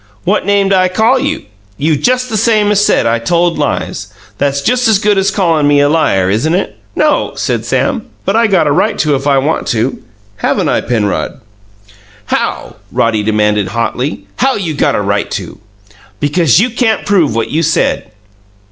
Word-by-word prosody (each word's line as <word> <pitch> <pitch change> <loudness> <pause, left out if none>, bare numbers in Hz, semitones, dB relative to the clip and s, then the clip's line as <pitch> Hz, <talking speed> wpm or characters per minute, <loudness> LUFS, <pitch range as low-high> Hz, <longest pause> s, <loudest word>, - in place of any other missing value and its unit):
"What 200 +1 0
name'd 200 -1 +2
I 185 -1 +3
call 220 +8 +2
you?" - - -2 0.3
"You 155 +2 +1
just 255 - 0
the - - -1
same 215 -1 +2
as 205 0 +3
said 210 - +2
I 115 0 +1
told 170 +7 0
lies. - - -3 0.3
That's 140 0 0
just 250 +1 +2
as 220 -2 +4
good 210 0 +1
as 195 +1 +1
callin' 165 -7 +1
me 145 0 +4
a 145 - +4
liar, 95 - +2
isn't 115 - +1
it?" 190 - -2 0.2
"No," - - +1
said - - -2
Sam; 270 -6 -1 0.2
"but 195 - 0
I 230 0 +3
got 190 -6 +2
a 145 - +2
right 210 +9 +1
to, 150 -2 +1
if 135 +1 -1
I 140 -1 +3
want 145 +4 -1
to. 115 +3 -1 0.4
Haven't - - 0
I, - - +1
Penrod?" 110 -2 -2 0.9
"How?" - - -3
Roddy 110 - +1
demanded 105 -1 +1
hotly. 120 +6 -3
"How 265 +1 +1
you 175 -6 -3
got 150 - +1
a - - 0
right 100 0 -1
to?" - - -9 0.6
"Because 150 0 +2
you 235 +4 +1
can't 235 -2 0
prove 175 - +2
what 115 -1 -2
you 160 - +1
said." 145 -5 0
165 Hz, 185 wpm, -13 LUFS, 130-205 Hz, 0.9 s, as